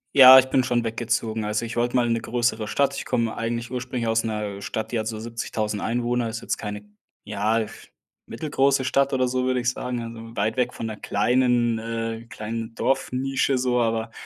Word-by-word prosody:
Ja, 130 -1 +11
ich 130 - +7
bin 130 - +3
schon 120 -2 +1
weggezogen. 115 -1 -1
Also, 105 +2 -1
ich 115 - -6
wollte 120 +1 0
mal 120 -1 +3
in 115 - +1
'ne 115 - -1
größere 115 -2 -1
Stadt. 140 +4 +1
Ich - - -4
komme 115 -1 -1
eigentlich 115 +1 -3
ursprünglich 125 -1 -3
aus 115 0 +2
'ner 105 -3 -3
Stadt, 110 - -4
die 115 - 0
hat 110 - -3
so 110 -1 -4
70.000 110 -2 -3
Einwohner 120 0 0
ist 115 +1 -5
jetzt - - -2
keine, 105 -1 -6 0.4
ja, 105 +2 0 0.6
mittelgroße 140 -3 +1
Stadt 135 +1 +2
oder 130 -1 +2
so, 130 0 0
würde 130 -1 +1
ich 125 +1 +1
sagen. 125 -2 -4
Also, 115 0 -9
weit 110 +3 0
weg 125 -1 +1
von - - -5
'ner 110 -1 -5
kleinen 120 +2 +2
äh, 115 0 -4
kleinen 115 +2 -5
Dorfnische 135 0 0
so, 125 -1 +1
aber 115 0 -1
115 Hz, 200 wpm, -24 LUFS, 110-125 Hz, 0.6 s, Ja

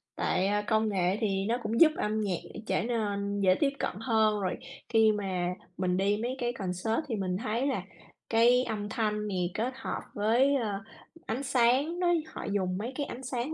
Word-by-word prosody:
Tại, 185 - +1
à, 205 +1 +1
công 220 -1 +2
nghệ 190 0 +1
thì 195 -3 0
nó 235 +2 +1
cũng 230 +3 -1
giúp 315 - +9
âm 215 +1 0
nhạc 190 -5 -1 0.3
trở - - +1
nên 205 -3 -1
dễ 185 -2 +4
tiếp 285 - +3
cận - - -2
hơn, 220 -2 +2
rồi 185 - -1 0.3
khi 220 -1 +5
mà 190 -4 -1 0.3
mình 180 -1 0
đi 200 +2 +2
mấy 245 +3 -2
cái 240 -1 -1
concert 195 - -1
thì 235 - -2
mình 185 -3 -1
thấy 235 +4 -1
là 250 -9 0 0.5
cái 240 +2 +5
âm 210 -4 -3
thanh 210 -1 -1
thì 180 -1 -1
kết 240 +6 -1
hợp 265 - -4
với, 240 +7 +3
ờ, 210 -6 -1 0.5
ánh 250 +5 -2
sáng 265 +7 +2
đó, 360 - +2 0.3
họ - - -6
dùng 185 -2 0
mấy 225 +5 -3
cái 290 0 -2
ánh 260 +2 -8
sáng 255 +3 -3
215 Hz, 200 wpm, -29 LUFS, 200-240 Hz, 0.5 s, giúp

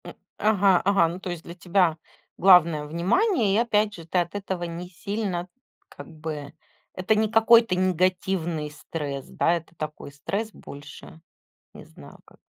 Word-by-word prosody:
М. - - -9 0.2
Ага, 200 -4 +3
ага, 195 -4 +4
ну 170 +3 -6
то 185 - -6
есть 175 -2 -6
для 170 - -10
тебя 180 -2 +1 0.4
главное- 170 -5 +5
внимание 205 - +1
и, - - +3
опять 215 -2 +1
же, 165 -4 -10
ты 170 - -2
от 175 +2 -3
этого 190 -3 -4
не 175 +1 -6
сильно, 190 -1 -4 0.4
как 145 - -11
бы 155 -2 -7 0.4
это 185 +4 +1
не 215 0 +1
какой-то 225 -2 +5
негативный 180 -3 0
стресс, 145 -3 -6
да, 165 - +1
это 170 0 -5
такой 155 -2 -7
стресс 200 +10 -4
больше, 150 +1 -12 0.5
не - - -12
знаю - - -15
как - - -21
180 Hz, 160 wpm, -25 LUFS, 160-200 Hz, 0.5 s, главное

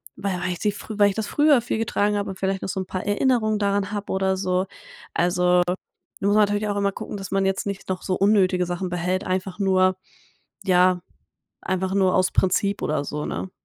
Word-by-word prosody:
weil 190 -3 -3
weil 180 - -1
ich - - -9
die 210 -1 0 0.2
weil 205 -1 +3
ich 195 - -4
das 220 -1 -2
früher 295 -4 +4
viel 230 -1 -2
getragen 210 -2 0
habe 200 - -2
und 185 - -10
vielleicht 190 0 -1
noch - - -3
so 190 - -2
'n 185 - -4
paar 185 +1 -4
Erinnerungen 215 0 +1
daran 200 0 0
habe 205 -1 -4
oder 190 0 +1
so. 185 0 0 0.5
Also, 180 +1 +3 0.6
man 200 - +1
muss 210 - +3
natürlich 205 0 +2
auch 205 - -1
immer 200 0 +1
gucken, 205 - -6
dass 195 -1 -7
man 195 0 +1
jetzt 195 +1 -1
nicht 200 -1 -5
noch 185 -1 -2
so 185 - -1
unnötige 190 -3 +3
Sachen 175 +1 -3
behält, 180 +1 -1
einfach 185 +1 -2
nur, 185 -1 +3 0.7
ja, 180 -1 +3 0.6
einfach 185 0 -1
nur 190 -2 +3
aus 185 - +2
Prinzip 195 +2 +1
oder 150 -1 0
so, 150 0 -4
ne? 190 - -4
190 Hz, 210 wpm, -23 LUFS, 185-205 Hz, 0.7 s, früher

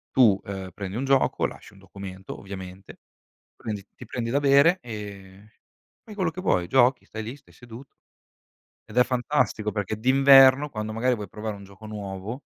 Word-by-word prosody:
Tu, 110 -7 +5
ehm, 95 -2 -6
prendi 95 0 -6
un 135 - -2
gioco, 135 0 +2
lasci - - -8
un 100 - -18
documento 95 -1 -9
ovviamente, 95 -1 -10 0.6
prendi 105 -3 -6
ti 125 - -11
prendi 115 0 -4
da 140 - +2
bere, 145 +6 +5
ehm, 100 -3 -9 0.6
fai 215 - -11
quello 185 -5 0
che 185 - -7
vuoi, 90 - +1
giochi, 125 +4 +3
stai 110 0 -7
lì, 115 +5 -6
stai 145 - -22
seduto. 125 +2 -12 1.0
Ed 105 - -11
è 125 - +6
fantastico 125 -4 -1
perché 105 0 -3
d'inverno, 135 +2 +6
quando 110 -3 -5
magari 125 +3 +1
vuoi 105 -4 -5
provare 105 +2 -6
un 100 - -12
gioco 100 +2 -15
nuovo 105 +3 -6
110 Hz, 170 wpm, -25 LUFS, 100-130 Hz, 1.0 s, è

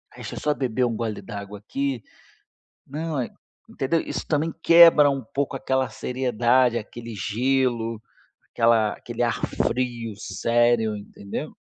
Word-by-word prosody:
"Deixa - - -7
só 150 0 +1
beber 125 -2 0
um 115 -2 -1
gole 110 -3 -3
d'água 100 0 -8
aqui. 130 +1 -3 0.8
Não, 155 +2 -4
hã", 125 - -1 0.4
entendeu? 160 +5 0
Isso - - -5
também 155 +1 0
quebra 165 -4 +8
um 135 -1 -1
pouco 140 +5 -3
aquela 130 -1 0
seriedade, 125 -1 +1
aquele 115 +1 -7
gelo, 115 +1 0 0.5
aquela 115 -2 +3
aquele - - -4
ar - - 0
frio 120 -2 -2
sério, 115 -1 +1
entendeu? 100 -1 -7
120 Hz, 130 wpm, -24 LUFS, 115-135 Hz, 0.8 s, quebra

